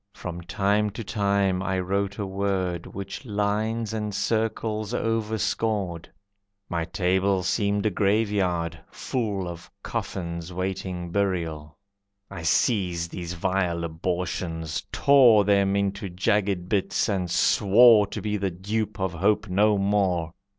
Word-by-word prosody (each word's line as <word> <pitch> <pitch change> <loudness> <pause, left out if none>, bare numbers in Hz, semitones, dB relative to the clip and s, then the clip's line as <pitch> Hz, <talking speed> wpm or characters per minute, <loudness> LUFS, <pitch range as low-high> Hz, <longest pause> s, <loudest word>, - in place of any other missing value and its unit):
From 90 -1 -6
time 100 +4 +1
to 115 - -4
time 100 -3 +1
I 95 0 -1
wrote 100 +2 -1
a 105 - -2
word 95 -3 -2
Which 100 +4 -7
lines 110 0 -1
and 105 -2 -3
circles 110 0 -1
overscored. 110 -5 -1 0.6
My 85 -1 -2
table 95 +2 +1
seemed 100 +2 0
a 110 - +2
graveyard, 95 -5 0
full 105 -7 -3
Of 85 -1 -8
coffins 85 -1 -4
waiting 90 -1 -4
burial. 85 -6 -2 0.5
I - - -6
seized 85 -1 +1
these 85 -1 -5
vile 90 -1 -1
abortions, 85 -1 -3
tore 125 -7 +6
Them 100 -1 +3
into 100 0 -1
jagged 95 0 0
bits, 100 -1 0
and 95 -4 -1
swore 105 +4 +5
To - - -6
be 105 -1 -1
the 100 -1 -1
dupe 100 +5 -3
of 95 -2 -1
hope 100 +4 +1
no 105 +3 +3
more. 95 -5 +1
95 Hz, 125 wpm, -25 LUFS, 90-105 Hz, 0.6 s, tore